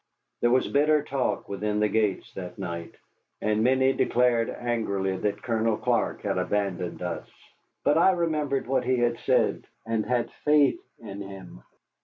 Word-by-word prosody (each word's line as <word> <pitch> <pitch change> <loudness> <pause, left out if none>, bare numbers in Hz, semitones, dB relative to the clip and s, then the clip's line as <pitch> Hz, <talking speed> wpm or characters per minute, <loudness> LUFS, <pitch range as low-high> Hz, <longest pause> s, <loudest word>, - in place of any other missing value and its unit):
There 120 - +3
was 130 +2 +3
bitter 150 +1 +3
talk 135 -3 -2
within 105 +1 -2
the 105 - +3
gates 105 -2 0
that 90 -2 -7
night, 85 -3 -6 0.4
and 110 0 +1
many 130 +2 +3
declared 120 -3 +2
angrily 100 -6 -1
that 100 +2 -2
Colonel 115 -2 +1
Clark - - 0
had - - 0
abandoned 90 -4 -2
us. 90 -1 -4 0.5
But 150 +3 +4
I 180 - +6
remembered 155 -6 0
what 135 +2 +1
he 130 0 +1
had 120 -1 +1
said, - - +1 0.2
and 110 -1 0
had 120 -1 0
faith 150 - +4 0.2
in 100 -3 -8
him. 95 -9 -10
115 Hz, 155 wpm, -26 LUFS, 100-130 Hz, 0.5 s, I